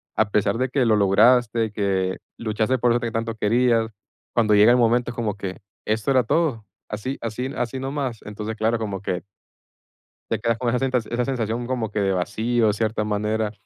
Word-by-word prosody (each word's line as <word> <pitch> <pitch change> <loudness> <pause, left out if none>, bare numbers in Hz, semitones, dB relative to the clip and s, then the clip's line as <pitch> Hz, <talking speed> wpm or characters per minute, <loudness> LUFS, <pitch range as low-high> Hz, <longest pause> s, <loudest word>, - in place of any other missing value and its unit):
a - - +2
pesar 105 +1 +1
de 130 0 0
que 130 -2 +1
lo 110 -1 +4
lograste, 110 +2 +4
que 95 -2 0 0.2
luchaste 110 +3 0
por 120 0 +2
eso 120 - +2
que 120 -1 -3
tanto 115 0 -2
querías, 115 +1 +2 0.5
cuando 110 -3 +3
llega 105 +3 +7
el 125 - +5
momento 120 +1 +2
es - - -12
como 110 -3 -2
que, 95 -2 -6 0.3
¿esto 110 +4 0
era 130 -2 +4
todo? 130 -6 0 0.2
¿Así 115 +6 -4
así 115 +3 -3
así 120 +2 -2
nomás? 135 -3 -3
Entonces, 105 +1 -5
claro, 115 +2 +1
como 100 -4 -4
que 90 -3 -3 1.1
te - - +1
quedas 115 -1 0
con 120 0 -1
esa 125 - +1
senta 130 -2 +1
esa 120 +2 -2
sensación 120 -2 -2
como 120 -4 -2
que 105 - -2
de 95 -1 +1
vacío, 110 +5 +1
cierta 110 +1 -1
manera. 105 +1 -1
115 Hz, 195 wpm, -23 LUFS, 105-120 Hz, 1.1 s, llega